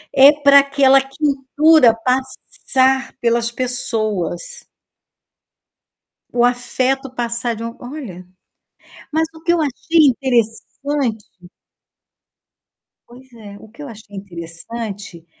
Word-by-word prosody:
É 275 Hz, +2 st, +8 dB
para 285 Hz, -1 st, +5 dB
aquela 275 Hz, -1 st, +4 dB
quentura 280 Hz, -1 st, +3 dB
passar 260 Hz, +1 st, -1 dB
pelas 235 Hz, 0 st, 0 dB
pessoas. 245 Hz, -, -3 dB, 1.7 s
O 240 Hz, 0 st, +1 dB
afeto 255 Hz, +2 st, -1 dB
passar 235 Hz, -1 st, -3 dB
de 230 Hz, -, -7 dB
um 230 Hz, 0 st, -6 dB
olha, 245 Hz, -, -9 dB, 0.9 s
mas 320 Hz, +1 st, 0 dB
o 320 Hz, -, -15 dB
que 340 Hz, +1 st, +1 dB
eu 340 Hz, -, +1 dB
achei 305 Hz, +2 st, +2 dB
interessante 245 Hz, 0 st, -1 dB, 1.8 s
Pois 250 Hz, +1 st, -17 dB
é. 210 Hz, -3 st, -12 dB
O 220 Hz, -, -15 dB
que 260 Hz, +7 st, -13 dB
eu 285 Hz, -, -8 dB
achei 215 Hz, -2 st, -13 dB
interessante 190 Hz, +1 st, -8 dB
250 Hz, 100 wpm, -18 LUFS, 225-280 Hz, 1.8 s, É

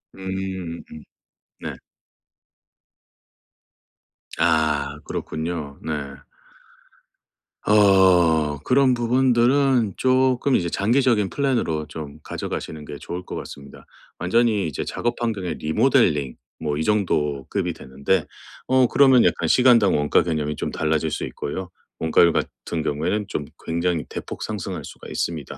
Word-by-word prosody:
음. 95 Hz, -3 st, -5 dB
음. 75 Hz, -, -10 dB, 0.6 s
네. -, -, -5 dB, 2.6 s
아. 80 Hz, -3 st, +1 dB
그렇군요. 80 Hz, -3 st, -5 dB
네. 70 Hz, -3 st, -4 dB, 1.5 s
어. 90 Hz, -7 st, +4 dB
그런 130 Hz, -, +3 dB
부분들은 125 Hz, -1 st, +2 dB
쪼끔 130 Hz, +1 st, +2 dB
이제 85 Hz, -1 st, 0 dB
장기적인 115 Hz, 0 st, +2 dB
플랜으로 115 Hz, -, -1 dB
좀 75 Hz, -1 st, -8 dB
가져가시는 75 Hz, -2 st, -5 dB
게 75 Hz, -, -8 dB
좋을 90 Hz, +1 st, -6 dB
것 -, -, -7 dB
같습니다. 70 Hz, -1 st, -10 dB, 0.3 s
완전히 105 Hz, -1 st, +2 dB
이제 75 Hz, -, -4 dB
작업 120 Hz, 0 st, -3 dB
환경의 95 Hz, -8 st, -2 dB
리모델링 80 Hz, -, +2 dB, 0.3 s
뭐 75 Hz, -1 st, -2 dB
이 80 Hz, -, -1 dB
정도 75 Hz, -10 st, 0 dB
급이 -, -, -1 dB
되는데 70 Hz, +8 st, -1 dB, 0.4 s
어 130 Hz, 0 st, +4 dB
그러면 130 Hz, -2 st, +5 dB
약간 -, -, +1 dB
시간당 120 Hz, -8 st, +5 dB
원가 75 Hz, 0 st, +3 dB
개념이 75 Hz, -3 st, -2 dB
좀 -, -, -4 dB
달라질 80 Hz, 0 st, 0 dB
수 -, -, -3 dB
있고요. 90 Hz, +5 st, -5 dB, 0.3 s
원가율 80 Hz, +1 st, +4 dB
같은 80 Hz, -2 st, -3 dB
경우에는 80 Hz, +9 st, -1 dB
좀 75 Hz, -7 st, -4 dB, 0.2 s
굉장히 85 Hz, 0 st, -1 dB
대폭 -, -, -6 dB
상승할 95 Hz, -4 st, -5 dB
수가 -, -, -11 dB
있습니다. 80 Hz, -5 st, -4 dB
90 Hz, 260 characters per minute, -23 LUFS, 75-115 Hz, 2.6 s, 그러면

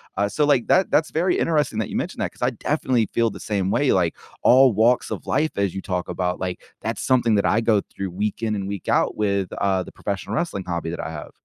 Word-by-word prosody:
Uh, 100 Hz, 0 st, +1 dB
so, 150 Hz, +8 st, +1 dB
like, 140 Hz, -5 st, +2 dB
that 190 Hz, -, +3 dB
that's 160 Hz, -, +2 dB
very 175 Hz, +3 st, +1 dB
interesting 150 Hz, -9 st, +1 dB
that 110 Hz, -, -2 dB
you -, -, -3 dB
mentioned -, -, -3 dB
that -, -, -1 dB
'cause -, -, -21 dB
I -, -, +2 dB
definitely 120 Hz, -4 st, 0 dB
feel 115 Hz, -1 st, +2 dB
the -, -, -10 dB
same 100 Hz, -3 st, -1 dB
way, 140 Hz, +6 st, +2 dB
like, 85 Hz, -3 st, +1 dB, 0.3 s
all 130 Hz, +1 st, +7 dB
walks 115 Hz, +4 st, +2 dB
of -, -, -5 dB
life, 155 Hz, +3 st, +1 dB
as 100 Hz, -2 st, 0 dB
you 95 Hz, -, -3 dB
talk 90 Hz, -3 st, -3 dB
about, 90 Hz, -1 st, -2 dB
like, 90 Hz, -1 st, -4 dB, 0.2 s
that's -, -, -4 dB
something 120 Hz, -4 st, +3 dB
that 100 Hz, -, +2 dB
I 110 Hz, -, +3 dB
go 110 Hz, -3 st, +2 dB
through 95 Hz, -1 st, -6 dB
week 105 Hz, +5 st, -3 dB
in 110 Hz, -2 st, 0 dB
and 100 Hz, -2 st, -3 dB
week 100 Hz, -1 st, -6 dB
out -, -, +1 dB
with, 100 Hz, -3 st, 0 dB
uh, 95 Hz, -2 st, 0 dB
the -, -, -12 dB
professional 100 Hz, +1 st, -4 dB
wrestling 160 Hz, -, -2 dB
hobby 85 Hz, -2 st, -3 dB
that 85 Hz, -, -4 dB
I -, -, -5 dB
have. 75 Hz, -2 st, -8 dB
105 Hz, 250 wpm, -23 LUFS, 95-125 Hz, 0.3 s, all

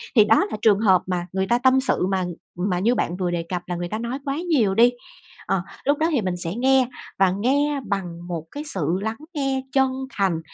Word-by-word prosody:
Thì 215 Hz, -3 st, +7 dB
đó 220 Hz, +1 st, +4 dB
là 215 Hz, -, -3 dB
trường 210 Hz, -3 st, +4 dB
hợp 190 Hz, -5 st, +4 dB
mà 180 Hz, -1 st, -2 dB
người 190 Hz, 0 st, 0 dB
ta 240 Hz, -, +3 dB
tâm 260 Hz, +1 st, +4 dB
sự 265 Hz, -8 st, +1 dB
mà 190 Hz, -1 st, 0 dB, 0.4 s
mà 180 Hz, -1 st, 0 dB
như 235 Hz, +6 st, +2 dB
bạn 175 Hz, +2 st, -1 dB
vừa 180 Hz, -2 st, -1 dB
đề 170 Hz, -1 st, -1 dB
cập 180 Hz, -1 st, -2 dB
là 175 Hz, -, -2 dB
người 175 Hz, 0 st, -3 dB
ta 215 Hz, -, -3 dB
nói 235 Hz, +3 st, -3 dB
quá 275 Hz, 0 st, -2 dB
nhiều 225 Hz, -11 st, +3 dB
đi. 240 Hz, +3 st, +6 dB, 0.6 s
Ờ, 185 Hz, -, 0 dB, 0.2 s
lúc 285 Hz, +1 st, +2 dB
đó 320 Hz, -, +2 dB
thì 280 Hz, -7 st, +2 dB
mình 185 Hz, -3 st, -2 dB
sẽ 175 Hz, 0 st, -3 dB
nghe 260 Hz, +1 st, +3 dB, 0.3 s
và 190 Hz, -1 st, +4 dB
nghe 275 Hz, +9 st, +1 dB
bằng 175 Hz, -4 st, -4 dB
một 165 Hz, -3 st, -4 dB
cái 290 Hz, -, -6 dB
sự 190 Hz, -, -1 dB
lắng 220 Hz, +2 st, -3 dB, 0.2 s
nghe 270 Hz, -2 st, -1 dB
chân 265 Hz, -1 st, +3 dB, 0.2 s
thành. 190 Hz, -8 st, 0 dB
210 Hz, 235 wpm, -23 LUFS, 180-265 Hz, 0.6 s, Thì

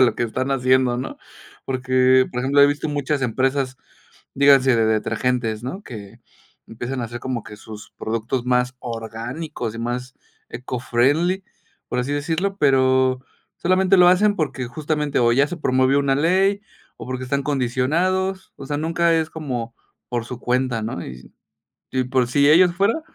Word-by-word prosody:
lo 125 Hz, -2 st, +4 dB
que -, -, -2 dB
están 130 Hz, +4 st, -2 dB
haciendo, 130 Hz, -1 st, +2 dB
¿no? 130 Hz, -, -6 dB, 0.5 s
Porque, 130 Hz, 0 st, +3 dB
por 125 Hz, -, -2 dB
ejemplo, 140 Hz, +2 st, +4 dB
he -, -, +8 dB
visto 145 Hz, +2 st, -1 dB
muchas 145 Hz, 0 st, -1 dB
empresas, 130 Hz, +2 st, 0 dB, 0.6 s
díganse 135 Hz, -2 st, +5 dB
de 115 Hz, -1 st, +2 dB
detergentes, 110 Hz, +1 st, -1 dB
¿no? 140 Hz, +11 st, -6 dB
Que 105 Hz, -, -10 dB, 0.5 s
empiezan 120 Hz, +3 st, -5 dB
a -, -, -2 dB
hacer 120 Hz, +1 st, -7 dB
como 125 Hz, -3 st, -3 dB
que 105 Hz, -, -11 dB
sus 105 Hz, 0 st, -11 dB
productos 115 Hz, +3 st, -3 dB
más 125 Hz, 0 st, +1 dB
orgánicos 115 Hz, +3 st, -6 dB
y 115 Hz, -, -7 dB
más 125 Hz, +2 st, -4 dB, 0.3 s
eco 125 Hz, +1 st, -5 dB
friendly, 155 Hz, +11 st, +1 dB, 0.4 s
por 125 Hz, -, -2 dB
así 125 Hz, +3 st, -1 dB
decirlo, 165 Hz, +7 st, -1 dB
pero 130 Hz, -3 st, +3 dB, 0.4 s
solamente 185 Hz, +2 st, +3 dB
lo 180 Hz, 0 st, +7 dB
hacen, 205 Hz, +3 st, +4 dB
porque 135 Hz, -7 st, -2 dB
justamente 150 Hz, +1 st, -2 dB
o 120 Hz, -1 st, +3 dB
ya 140 Hz, +4 st, +3 dB
se 175 Hz, -, -7 dB
promovió 130 Hz, 0 st, +2 dB
una 140 Hz, -1 st, +1 dB
ley 190 Hz, +7 st, +2 dB, 0.3 s
o -, -, -9 dB
porque 130 Hz, 0 st, -4 dB
están 140 Hz, +2 st, -1 dB
condicionados, 160 Hz, +9 st, -1 dB
o -, -, -9 dB
sea 145 Hz, -1 st, -2 dB
nunca 165 Hz, +2 st, +1 dB
es 160 Hz, -1 st, 0 dB
como 125 Hz, -7 st, -5 dB, 0.3 s
por 120 Hz, -2 st, -2 dB
su 125 Hz, 0 st, -8 dB
cuenta, 125 Hz, -2 st, 0 dB
¿no? 110 Hz, -6 st, -4 dB
Y 65 Hz, 0 st, -11 dB, 0.6 s
y 130 Hz, -1 st, 0 dB
por 125 Hz, -1 st, 0 dB
si 140 Hz, +4 st, +3 dB
ellos 175 Hz, +3 st, +5 dB
fueran 200 Hz, -, +1 dB
130 Hz, 165 wpm, -21 LUFS, 125-150 Hz, 0.6 s, he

